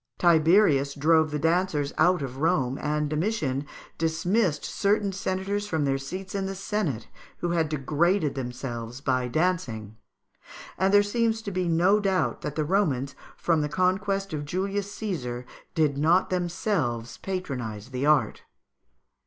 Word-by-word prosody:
Tiberius 160 -4 +4
drove 160 +2 +3
the 150 - -2
dancers 160 -2 +1
out 180 -4 +3
of 130 -1 -6
Rome, 140 -4 +1
and 150 0 0
Domitian 150 -4 -1 0.3
dismissed 165 +1 +1
certain 205 0 +1
senators 195 +2 -2
from 160 -7 0
their 135 0 +1
seats 185 +7 -6
in 195 -1 -1
the 195 - -4
senate 180 - -2 0.3
who 175 - -2
had 165 -3 +1
degraded 155 +3 +1
themselves 125 -2 -5
by 130 -3 0
dancing; 120 - -1 0.8
and 190 +1 +2
there 205 0 +6
seems 225 +1 0
to 200 - -4
be 185 -1 -1
no 175 +5 +4
doubt 195 -3 0
that 150 - -4
the 155 - 0
Romans, 145 -7 +1 0.2
from 165 -3 +1
the 150 - -1
conquest 195 +2 0
of 150 -1 -2
Julius 195 +5 -2
Caesar, 130 - -4 0.3
did 150 -3 +2
not 170 +6 +3
themselves 175 - -1
patronise 125 - -4
the 130 +2 -2
art. 140 -8 +3
160 Hz, 145 wpm, -26 LUFS, 140-190 Hz, 0.8 s, there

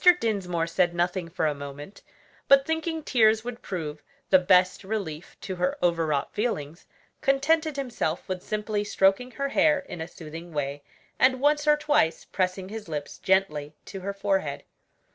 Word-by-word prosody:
Dinsmore 180 -7 -1
said 170 +1 +1
nothing 175 0 -1
for 165 - -1
a 150 - +2
moment; 145 +5 -9 0.5
but 275 0 +6
thinking 320 0 -2
tears 220 -4 +4
would 245 0 -6
prove 155 -5 -5 0.3
the 190 - +8
best 180 +1 +3
relief 190 -6 -5
to 190 -2 -5
her 180 +1 0
overwrought 160 -5 +1
feelings, 170 -9 -3 0.3
contented 305 +3 +2
himself 245 - -2
with 185 -1 -3
simply 210 0 -2
stroking 195 +4 +2
her 275 +3 -2
hair 300 +2 +4
in 280 - -7
a 160 - -4
soothing 165 0 -10
way, 145 -1 -2 0.4
and 260 0 +4
once 295 +2 +2
or 300 0 +6
twice 295 - +1
pressing 185 0 -2
his 215 -3 -7
lips 145 -2 -5
gently 150 -6 +1
to 195 - -7
her 195 +2 -3
forehead. 195 -7 -1
190 Hz, 160 wpm, -26 LUFS, 165-245 Hz, 0.5 s, the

